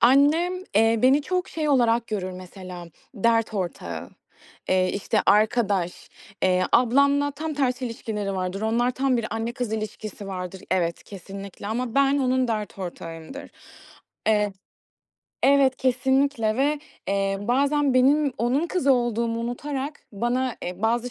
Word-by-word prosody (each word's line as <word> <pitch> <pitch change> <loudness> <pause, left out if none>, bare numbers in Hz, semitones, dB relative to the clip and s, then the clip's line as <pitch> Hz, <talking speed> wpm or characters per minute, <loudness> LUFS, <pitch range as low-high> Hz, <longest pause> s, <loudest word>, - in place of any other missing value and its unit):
Annem, 295 +8 +4 0.2
eee, 225 +1 +4
beni 270 +3 +5
çok 365 +3 -1
şey 310 -2 -2
olarak 240 -4 +3
görür 190 -4 -3
mesela, 180 -1 -9 0.3
dert 225 +1 +2
ortağı, 85 - -4 0.6
eee, 185 0 +2
işte 200 - 0
arkadaş. 205 -4 +2 0.3
Eee, 185 0 +3
ablamla 280 +4 +4
tam 305 +2 -5
tersi 255 -2 0
ilişkileri 210 -4 -4
vardır. 185 +1 -3
Onlar, 235 +3 +2
tam 260 0 +1
bir 225 -2 -1
anne-kız 235 0 -3
ilişkisi 215 -2 -5
vardır. 185 -1 -6
Evet, 170 -2 0
kesinlikle 195 +1 -9
ama 235 +2 -2
ben 275 0 +4
onun 255 -2 +1
dert 215 -3 -3
ortağıyımdır. 170 - -7 0.8
Eee 210 -2 +2 0.9
Evet, 275 -1 +5
kesinlikle 260 -3 +1
ve 290 +3 +2 0.3
eee, 195 0 0
bazen 275 +4 +2
benim 280 +2 +4
onun 255 +8 +1
kızı 330 -6 +2
olduğumu 235 -2 0
unutarak 270 +4 -4
bana, 245 +4 -1
eee, 180 +3 -6
bazı 235 +2 +1
235 Hz, 130 wpm, -24 LUFS, 200-270 Hz, 0.9 s, beni